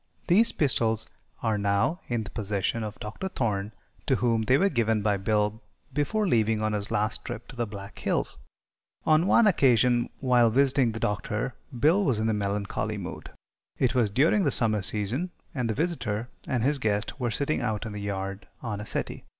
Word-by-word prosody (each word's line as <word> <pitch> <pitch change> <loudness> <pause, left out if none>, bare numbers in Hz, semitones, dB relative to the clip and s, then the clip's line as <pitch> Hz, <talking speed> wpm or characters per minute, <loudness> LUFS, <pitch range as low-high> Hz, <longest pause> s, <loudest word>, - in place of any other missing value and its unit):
These 215 +6 +4
pistols 115 -6 +2 0.4
are 110 -3 +1
now 100 - +1
in 120 -2 -1
the 100 - -9
possession 105 +1 -1
of 105 -1 -6
Dr. 110 - -5
Thorne, 105 - -2 0.4
to - - +3
whom 115 -2 +1
they 130 +4 +3
were 195 - +3
given 115 - +1
by 105 -1 +2
Bill 105 +2 0 0.3
before 200 +9 0
leaving 110 - +2
on 110 0 0
his 105 -1 -2
last 105 +1 -1
trip 110 - -7
to - - -10
the 120 -1 -2
Black 100 -1 -9
Hills. - - -1 0.7
On 155 +3 +4
one 235 - +5
occasion, 125 - +3
while 125 -3 +4
visiting 130 -1 +3
the 110 - -5
Doctor, 105 +4 -2 0.3
Bill 165 - +4
was 130 - +1
in 110 +1 0
a - - +2
melancholy 100 -1 -2
mood. - - -7 0.5
It 125 - +2
was 120 -5 +2
during 155 - +3
the 145 - +3
summer 110 -5 +3
season, 110 - 0 0.2
and 125 -6 -1
the 110 - -1
visitor 125 -8 -2 0.2
and 125 -3 0
his 140 +2 +1
guest 105 +2 -1
were 120 -2 0
sitting 140 +6 -1
out 110 0 -2
in 110 - -5
the 105 0 -6
yard 100 0 -4 0.2
on 105 -4 -3
a 105 - -7
settee. - - -3
115 Hz, 190 wpm, -27 LUFS, 105-135 Hz, 0.7 s, one